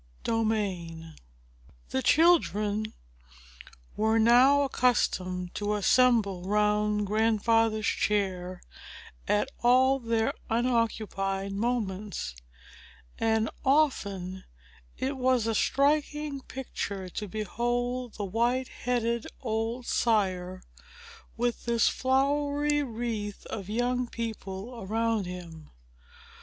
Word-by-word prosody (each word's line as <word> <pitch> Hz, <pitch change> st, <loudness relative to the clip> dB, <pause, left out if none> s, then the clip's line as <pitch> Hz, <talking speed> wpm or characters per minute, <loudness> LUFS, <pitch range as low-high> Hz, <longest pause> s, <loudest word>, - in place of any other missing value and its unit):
Chapter 225 Hz, -1 st, +1 dB
IX 175 Hz, -6 st, -4 dB, 0.9 s
The 130 Hz, -, -1 dB
children 215 Hz, -, +3 dB, 1.0 s
were 220 Hz, +1 st, +2 dB
now 250 Hz, +5 st, +6 dB
accustomed 185 Hz, -9 st, 0 dB
to 210 Hz, 0 st, -1 dB
assemble 210 Hz, -4 st, +3 dB
round 210 Hz, 0 st, +2 dB
Grandfather's 220 Hz, +1 st, +2 dB
chair, 185 Hz, -3 st, -1 dB, 0.6 s
at 210 Hz, +6 st, +1 dB
all 260 Hz, +2 st, +4 dB
their 230 Hz, +2 st, 0 dB, 0.2 s
unoccupied 220 Hz, -5 st, 0 dB
moments; 200 Hz, -, -2 dB, 0.8 s
and 220 Hz, -1 st, +2 dB, 0.2 s
often 200 Hz, -11 st, +1 dB, 0.5 s
it 270 Hz, +1 st, -2 dB
was 255 Hz, -3 st, +2 dB
a 225 Hz, -, 0 dB
striking 290 Hz, +3 st, +1 dB
picture 200 Hz, -8 st, -5 dB
to 210 Hz, +4 st, -5 dB
behold 240 Hz, +4 st, -2 dB
the 205 Hz, -, -3 dB
white 240 Hz, +6 st, 0 dB
headed 235 Hz, -1 st, -1 dB
old 225 Hz, +1 st, -2 dB
sire, 185 Hz, -6 st, 0 dB, 0.7 s
with 240 Hz, 0 st, -1 dB
this 235 Hz, -1 st, +3 dB
flowery 285 Hz, +2 st, +1 dB
wreath 225 Hz, -5 st, -4 dB
of 200 Hz, -3 st, -5 dB
young 245 Hz, +2 st, 0 dB
people 225 Hz, 0 st, -6 dB
around 220 Hz, 0 st, 0 dB
him. 170 Hz, -4 st, -9 dB
225 Hz, 90 wpm, -28 LUFS, 200-250 Hz, 1.0 s, now